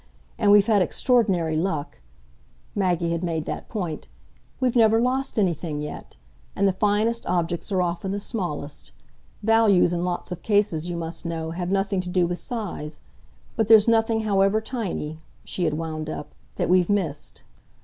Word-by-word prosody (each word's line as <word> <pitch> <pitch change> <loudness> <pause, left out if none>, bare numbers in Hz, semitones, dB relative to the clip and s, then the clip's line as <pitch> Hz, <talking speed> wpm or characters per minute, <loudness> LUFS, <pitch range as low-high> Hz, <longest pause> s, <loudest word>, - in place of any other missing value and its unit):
And 210 -3 +4
we've 205 -1 +7
had 215 -3 +3
extraordinary 185 -6 +2
luck" 160 - -2 0.7
Maggie 175 -4 0
had 170 +1 -2
made 165 -3 -2
that - - -5
point; 175 - -4 0.5
"we've 255 -2 +1
never 225 -1 +5
lost 260 +2 0
anything 170 -6 0
yet. 150 0 -7 0.4
And 200 - +2
the - - +4
finest 210 +4 +1
objects 175 +2 -1
are 185 -2 +2
often 175 +2 -2
the 200 +1 -2
smallest. 155 - -5 0.5
Values, 220 -5 +4
in 175 0 -1
lots 180 0 -3
of 175 -1 -5
cases, 200 -6 +1
you 175 - -3
must 165 0 -5
know, 165 -1 -3
have 175 +1 -3
nothing 195 0 0
to 180 - -7
do 180 -1 +2
with 175 0 -3
size. 185 -9 -5 0.5
But 220 -3 +1
there's 220 -1 +7
nothing, 225 -1 +3
however 200 0 +2
tiny," 210 - -4 0.2
she 180 - -3
had 155 -2 0
wound 155 -1 -4
up, 150 - -6 0.2
"that - - -1
we've 180 -1 +3
missed." 170 -8 -2
185 Hz, 165 wpm, -24 LUFS, 165-215 Hz, 0.7 s, we've